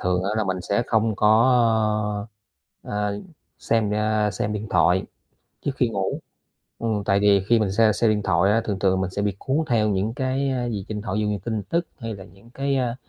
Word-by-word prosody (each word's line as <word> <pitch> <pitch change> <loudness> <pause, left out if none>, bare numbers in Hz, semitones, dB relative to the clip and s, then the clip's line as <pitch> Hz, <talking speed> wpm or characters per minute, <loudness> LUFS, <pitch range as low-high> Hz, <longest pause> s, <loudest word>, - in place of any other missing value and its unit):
thường 90 0 0
á 100 - 0
là 110 - +1
mình 95 -1 -2
sẽ 100 +5 0
không 110 -2 +1
có, 105 - +3 1.5
ơ, - - -10 0.2
ờ, 100 0 -4 0.4
xem, 110 -2 0
a, 105 0 +1
xem, 100 +2 -3
a, - - -2
điện 105 0 -4
thoại 90 +2 +3 0.6
trước 140 - +1
khi 125 -3 +1
ngủ, 95 -3 -2 0.6
ừm, 110 -3 -1
tại 100 -1 +2
vì 100 -1 +4
khi 115 -1 +5
mình 105 -3 0
xem 110 +1 +4
xem 110 +2 +2
điện 105 -1 +1
thoại 90 +4 +3
á, 115 +2 +3
thường 100 -3 -2
thường 95 -1 +2
mình 95 - -1
sẽ 100 - -3
bị 100 -2 -1
cuốn 135 +2 -1
theo 110 -3 +2
những 100 +3 -1
cái, 130 +2 -1
a, 125 -2 -1
gì 105 -5 -4
trên 105 - -4
điện - - -4
thoại. 105 -2 -4
Ví - - +1
dụ 105 - 0
như 105 -1 -1
tin 110 -3 -2
tức 170 - -1
hay 115 -2 -5
là 95 -2 -9
những 95 +5 -18
cái, 135 +2 -2
a, 125 -2 -1
105 Hz, 240 wpm, -23 LUFS, 100-115 Hz, 1.5 s, khi